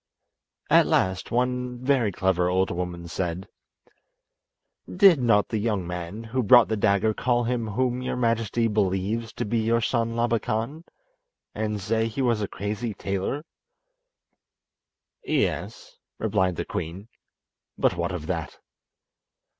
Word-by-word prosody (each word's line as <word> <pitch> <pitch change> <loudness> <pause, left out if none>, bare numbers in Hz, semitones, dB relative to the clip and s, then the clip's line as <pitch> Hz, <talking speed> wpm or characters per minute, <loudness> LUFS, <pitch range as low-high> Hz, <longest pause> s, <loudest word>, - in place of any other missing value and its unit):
At - - +6
last 95 0 +1
one 125 0 -1
very 125 -4 +1
clever 90 -1 +1
old 95 +1 +1
woman 85 -1 -4
said: 90 +2 -3 1.4
"Did 180 -6 +6
not 115 -4 +3
the 110 - -1
young 105 -4 -1
man 90 +5 -5
who 120 +3 -1
brought 120 +1 +6
the 110 - +1
dagger 105 +1 +2
call 120 +2 +1
him 120 -1 -1
whom 125 +3 -1
your 130 - -2
majesty 115 -1 +1
believes 105 +2 -1
to - - -3
be 115 +2 0
your 115 +1 +2
son 115 0 0
Labakan, 115 +6 -1 0.7
and 105 -1 -2
say 110 +3 0
he 125 +4 -3
was 115 -4 +1
a 100 - -1
crazy 105 +3 -4
tailor?" 100 - -3 1.8
"Yes," - - -2 0.2
replied 95 -4 0
the - - -3
queen; 90 +6 -5 0.7
"but - - +2
what - - -2
of 75 - -5
that?" 85 -2 -4
110 Hz, 130 wpm, -25 LUFS, 95-120 Hz, 1.8 s, At